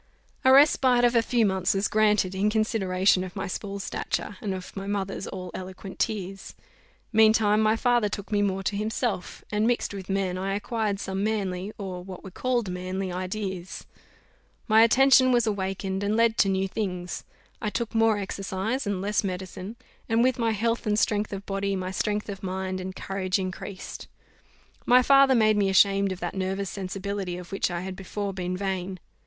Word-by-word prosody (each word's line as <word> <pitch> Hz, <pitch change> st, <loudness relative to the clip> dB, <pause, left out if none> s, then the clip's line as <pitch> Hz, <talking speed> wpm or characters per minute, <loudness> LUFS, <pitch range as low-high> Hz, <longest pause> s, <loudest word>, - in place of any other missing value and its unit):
A 260 Hz, -, +6 dB
respite 265 Hz, -3 st, +6 dB
of 240 Hz, -, +3 dB
a 230 Hz, -, +6 dB
few 230 Hz, 0 st, +2 dB
months 190 Hz, -1 st, +1 dB
was 195 Hz, +1 st, +1 dB
granted, 210 Hz, -3 st, +2 dB
in 195 Hz, +2 st, +1 dB
consideration 195 Hz, -4 st, +2 dB
of 185 Hz, -1 st, -8 dB
my -, -, -3 dB
small 200 Hz, +2 st, -5 dB
stature, 200 Hz, +1 st, -3 dB
and 205 Hz, -, -2 dB
of 185 Hz, -1 st, -6 dB
my 195 Hz, 0 st, -5 dB
mother's 195 Hz, -1 st, -3 dB
all 185 Hz, -2 st, -6 dB
eloquent 185 Hz, +1 st, -8 dB
tears. 195 Hz, -2 st, -3 dB, 0.6 s
Meantime 215 Hz, -1 st, +5 dB
my 215 Hz, 0 st, +3 dB
father 240 Hz, -2 st, +2 dB
took 200 Hz, +1 st, -6 dB
me 205 Hz, -1 st, +2 dB
more 195 Hz, -1 st, 0 dB
to 200 Hz, -, -1 dB
himself; 215 Hz, -1 st, -2 dB
and, 210 Hz, +1 st, +1 dB
mixed 240 Hz, -3 st, 0 dB
with 195 Hz, -1 st, -7 dB
men, 190 Hz, -2 st, -1 dB
I 195 Hz, +1 st, -1 dB
acquired 210 Hz, -1 st, -2 dB
some 195 Hz, 0 st, -3 dB
manly, 200 Hz, -3 st, -2 dB
or 185 Hz, -3 st, -6 dB
what 185 Hz, -1 st, -9 dB
were 190 Hz, -, -9 dB
called 245 Hz, +1 st, -1 dB
manly, 185 Hz, +1 st, -3 dB
ideas. 185 Hz, 0 st, -4 dB, 0.8 s
My 220 Hz, -1 st, +6 dB
attention 255 Hz, +2 st, +6 dB
was 240 Hz, -2 st, +3 dB
awakened, 195 Hz, -2 st, -2 dB
and 205 Hz, +1 st, 0 dB
led 230 Hz, 0 st, +3 dB
to 195 Hz, -, +5 dB
new 190 Hz, 0 st, +1 dB
things. 180 Hz, -3 st, -4 dB, 0.4 s
I 210 Hz, -, -1 dB
took 235 Hz, +2 st, -3 dB
more 225 Hz, -1 st, +3 dB
exercise 195 Hz, +4 st, -3 dB
and 200 Hz, -2 st, -1 dB
less 205 Hz, +2 st, 0 dB
medicine; 185 Hz, +2 st, -5 dB, 0.3 s
and 225 Hz, +1 st, +3 dB
with 255 Hz, -1 st, +2 dB
my 230 Hz, -1 st, +2 dB
health 230 Hz, +1 st, -1 dB
and 210 Hz, 0 st, +2 dB
strength 210 Hz, -1 st, +1 dB
of 200 Hz, 0 st, -6 dB
body 195 Hz, 0 st, -1 dB
my 185 Hz, 0 st, -3 dB
strength 210 Hz, +2 st, -1 dB
of 195 Hz, -2 st, -6 dB
mind 190 Hz, -1 st, -3 dB
and 185 Hz, 0 st, -6 dB
courage 190 Hz, -1 st, -1 dB
increased. 185 Hz, 0 st, -6 dB, 0.8 s
My 250 Hz, +1 st, +5 dB
father 275 Hz, 0 st, +6 dB
made 215 Hz, -2 st, +4 dB
me 200 Hz, -1 st, +2 dB
ashamed 195 Hz, 0 st, +4 dB
of 185 Hz, -, -6 dB
that 175 Hz, -, -3 dB
nervous 190 Hz, 0 st, -2 dB
sensibility 195 Hz, -1 st, -4 dB
of 180 Hz, -1 st, -10 dB
which 195 Hz, -, 0 dB
I 175 Hz, -1 st, -3 dB
had 190 Hz, 0 st, -5 dB
before 195 Hz, +1 st, -4 dB
been 180 Hz, -1 st, -3 dB
vain. 190 Hz, -1 st, -3 dB
200 Hz, 185 wpm, -26 LUFS, 190-215 Hz, 0.8 s, A